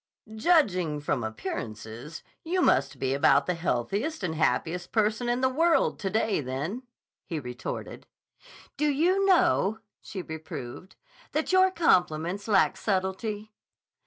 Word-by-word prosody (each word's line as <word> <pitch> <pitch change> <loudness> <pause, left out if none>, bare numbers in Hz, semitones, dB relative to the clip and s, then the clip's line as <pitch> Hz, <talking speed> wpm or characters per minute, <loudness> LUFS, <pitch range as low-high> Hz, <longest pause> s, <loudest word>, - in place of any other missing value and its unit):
"Judging 200 - +2
from 145 -4 -1
appearances, 110 +5 -6 0.2
you 355 +3 -1
must 135 +1 +2
be 130 0 -1
about 140 0 +4
the 180 - 0
healthiest 195 - -2
and 170 -3 -1
happiest 160 +3 0
person 220 +2 +1
in 240 +1 0
the 260 - +4
world 325 +5 +2
to 195 - -2
day, 215 -3 +1
then," 145 - -4 0.4
he 165 - -4
retorted. 125 -3 -6 0.7
"Do 300 - +1
you 350 +7 +2
know," 335 - +3 0.2
she 190 -4 -7
reproved, 160 +1 -8 0.4
"that 310 +4 0
your 375 0 +5
compliments 180 - +1
lack 200 -3 +3
subtlety?" 205 +2 -2
190 Hz, 130 wpm, -27 LUFS, 150-255 Hz, 0.7 s, your